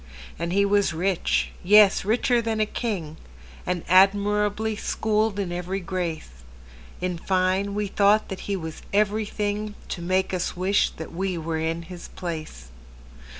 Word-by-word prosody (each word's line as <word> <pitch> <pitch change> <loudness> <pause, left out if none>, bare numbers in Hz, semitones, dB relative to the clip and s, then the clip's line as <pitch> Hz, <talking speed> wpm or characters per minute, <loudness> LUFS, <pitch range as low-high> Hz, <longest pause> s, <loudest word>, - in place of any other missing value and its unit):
And 170 +1 -2
he 200 +2 +3
was 200 -4 +2
rich,—yes, 195 +3 +3
richer 235 +3 +2
than 225 -1 -2
a 215 - +3
king,—And 160 - -5
admirably 205 +3 +3
schooled 215 0 0
in 195 -3 -2
every 180 +2 -3
grace:In 65 - -6
fine, 190 +2 0
we 210 0 0
thought 205 +2 +3
that 190 - -5
he 200 - +1
was 160 -4 -6
everythingTo 210 -1 -1
make 185 +2 0
us 180 0 -2
wish 190 +3 +2
that 160 - -8
we 185 +1 -2
were 160 0 -3
in 165 +1 -2
his 175 +1 -9
place. 160 - -7
190 Hz, 130 wpm, -25 LUFS, 170-205 Hz, -, he